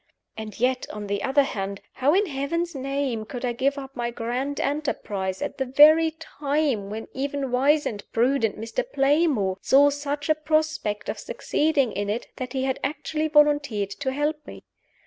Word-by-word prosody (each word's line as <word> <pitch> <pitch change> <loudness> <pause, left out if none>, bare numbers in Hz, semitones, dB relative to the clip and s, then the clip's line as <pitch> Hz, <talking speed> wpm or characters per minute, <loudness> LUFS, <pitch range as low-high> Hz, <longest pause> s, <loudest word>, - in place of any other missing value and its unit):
And 220 -2 -8
yet, 255 +1 +1
on 210 0 -6
the 200 0 -2
other 280 +2 +3
hand, 200 -6 -4
how 285 +5 +2
in 405 +2 +3
Heaven's 335 +3 -2
name 275 -4 -2
could 245 +3 -5
I 240 - 0
give 275 +4 0
up 270 -1 -8
my 240 0 -2
grand 245 +4 -3
enterprise 210 -10 -2
at - - -5
the 265 - +1
very 305 +5 +7
time 285 -9 -1
when 220 +2 -6
even 275 -1 -3
wise 285 +4 +3
and 205 -2 -4
prudent 235 -2 +1
Mr. 230 - -2
Playmore 275 - +2
saw 285 +2 +5
such 285 0 -3
a 310 - +5
prospect 310 -9 -1
of - - -3
succeeding 310 - 0
in 205 0 -3
it 220 +3 -2
that 255 0 -5
he 260 -1 -1
had 265 0 -1
actually 310 +2 -2
volunteered 290 -9 +3
to 265 +4 -3
help 295 +3 0
me? - - -10
275 Hz, 175 wpm, -25 LUFS, 230-295 Hz, -, very